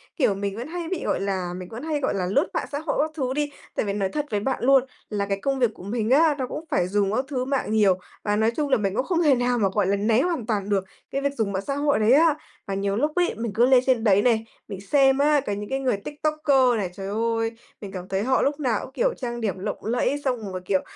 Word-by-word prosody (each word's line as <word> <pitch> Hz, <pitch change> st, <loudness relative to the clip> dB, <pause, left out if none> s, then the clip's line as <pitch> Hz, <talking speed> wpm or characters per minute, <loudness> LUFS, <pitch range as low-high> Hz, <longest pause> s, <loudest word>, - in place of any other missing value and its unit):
kiểu, 245 Hz, -, +2 dB
mình 200 Hz, 0 st, -3 dB
vẫn 240 Hz, +5 st, -5 dB
hay 340 Hz, 0 st, -5 dB
bị, 370 Hz, -2 st, -3 dB
gọi -, -, 0 dB
là, 190 Hz, -3 st, -2 dB
mình 185 Hz, -1 st, -8 dB
vẫn 230 Hz, +4 st, -8 dB
hay, 310 Hz, -2 st, -1 dB
gọi 265 Hz, -, 0 dB
là, 190 Hz, -2 st, -1 dB
lướt 190 Hz, +1 st, +2 dB
mạng -, -, -2 dB
xã 285 Hz, -, -2 dB
hội 315 Hz, -, -2 dB
các 310 Hz, +1 st, -1 dB
thứ 260 Hz, -5 st, -2 dB
đi, 295 Hz, +1 st, -1 dB, 0.2 s
tại -, -, 0 dB
vì 200 Hz, -, -1 dB
nói 195 Hz, -2 st, -1 dB
thật 295 Hz, +5 st, -2 dB
với 210 Hz, -, +1 dB
bạn 260 Hz, +5 st, -2 dB
luôn 270 Hz, 0 st, +5 dB, 0.3 s
là 205 Hz, -2 st, -1 dB
cái 200 Hz, 0 st, -2 dB
công 275 Hz, -1 st, 0 dB
việc 240 Hz, -3 st, +3 dB
của -, -, -13 dB
mình 220 Hz, +2 st, -2 dB
á, 300 Hz, +3 st, +5 dB
nó 255 Hz, -2 st, -2 dB
cũng 315 Hz, -, -6 dB
phải 180 Hz, -, +2 dB
dùng 200 Hz, 0 st, +1 dB
các 260 Hz, -, 0 dB
thứ 255 Hz, -3 st, -2 dB
mạng 270 Hz, -5 st, -1 dB
nhiều, 205 Hz, -4 st, +4 dB, 0.3 s
và 205 Hz, -1 st, +1 dB
nói 220 Hz, +2 st, +2 dB
chung 295 Hz, -2 st, -1 dB
là 260 Hz, -, +4 dB
mình 195 Hz, -2 st, -1 dB
cũng 255 Hz, -, 0 dB
không 345 Hz, -2 st, +1 dB
thể 290 Hz, -4 st, +5 dB
nào 245 Hz, 0 st, +1 dB
mà, 200 Hz, -3 st, +2 dB
gọi 205 Hz, -2 st, +1 dB
là, 200 Hz, -, +2 dB
né 220 Hz, +4 st, +2 dB
hoàn 335 Hz, -8 st, -1 dB
toàn 205 Hz, -3 st, -2 dB
được 195 Hz, -2 st, +1 dB, 0.3 s
cái 275 Hz, -, -1 dB
việc 280 Hz, 0 st, 0 dB
dùng 220 Hz, -6 st, -1 dB
mạng 195 Hz, +1 st, -2 dB
xã 275 Hz, -, -1 dB
hội 285 Hz, -2 st, +1 dB
đấy 215 Hz, +2 st, +3 dB
á. 315 Hz, +1 st, +5 dB, 0.3 s
Mà 195 Hz, -, -3 dB
nhiều 195 Hz, 0 st, -1 dB
lúc 300 Hz, +6 st, +1 dB
ấy, 355 Hz, -1 st, +2 dB
mình 230 Hz, -1 st, -3 dB
cứ 240 Hz, +2 st, +5 dB
lên 255 Hz, -1 st, +5 dB
trên 250 Hz, -4 st, +2 dB
đấy 205 Hz, -2 st, +4 dB
này, 225 Hz, -1 st, +2 dB, 0.2 s
mình 195 Hz, -2 st, -7 dB
xem 270 Hz, +4 st, +3 dB
á, 295 Hz, +1 st, +4 dB
cả 205 Hz, -, -1 dB
những 205 Hz, +1 st, -5 dB
cái 270 Hz, 0 st, -1 dB
người 255 Hz, -6 st, 0 dB
TikToker 290 Hz, 0 st, +1 dB
này, 190 Hz, -4 st, -2 dB
trời 195 Hz, 0 st, -6 dB
ơi, 225 Hz, +2 st, 0 dB, 0.3 s
mình 200 Hz, -2 st, -7 dB
cảm 185 Hz, -1 st, -7 dB
thấy 190 Hz, +1 st, -1 dB
họ 260 Hz, +2 st, +2 dB
lúc 285 Hz, +1 st, 0 dB
nào 255 Hz, -6 st, +1 dB
cũng, 265 Hz, -, -13 dB
kiểu, -, -, +1 dB
trang 240 Hz, -2 st, -5 dB
điểm 195 Hz, -4 st, -2 dB
lộng 190 Hz, -, -5 dB
lẫy 245 Hz, +5 st, 0 dB
xong 225 Hz, -7 st, -2 dB
rồi, 185 Hz, -, -5 dB
kiểu, 190 Hz, -1 st, +1 dB
235 Hz, 290 wpm, -24 LUFS, 200-280 Hz, 0.3 s, luôn